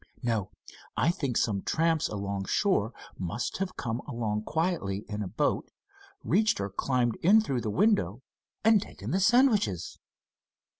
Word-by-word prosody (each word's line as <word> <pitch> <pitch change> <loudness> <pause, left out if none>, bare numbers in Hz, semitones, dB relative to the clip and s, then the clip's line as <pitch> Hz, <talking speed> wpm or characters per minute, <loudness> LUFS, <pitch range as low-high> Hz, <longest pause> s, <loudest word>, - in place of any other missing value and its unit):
No, 110 -5 0 0.5
I 165 - +3
think 140 -8 -2
some 100 -4 +1
tramps 165 -1 +1
along 100 -1 -3
shore 155 - +1 0.3
must 95 +6 -3
have 190 -1 -3
come 115 -1 -2
along 110 -2 -2
quietly 155 - -1
in 105 -1 -4
a 100 - -3
boat, 145 +10 -1 0.5
reached 215 +2 +2
or 100 0 -3
climbed 120 +2 0
in 200 +6 +5
through 135 - -1
the 110 - -2
window 135 - +1 0.4
and 220 -2 +5
taken - - -7
the 190 - +2
sandwiches." 215 - +3
120 Hz, 145 wpm, -29 LUFS, -, 0.5 s, in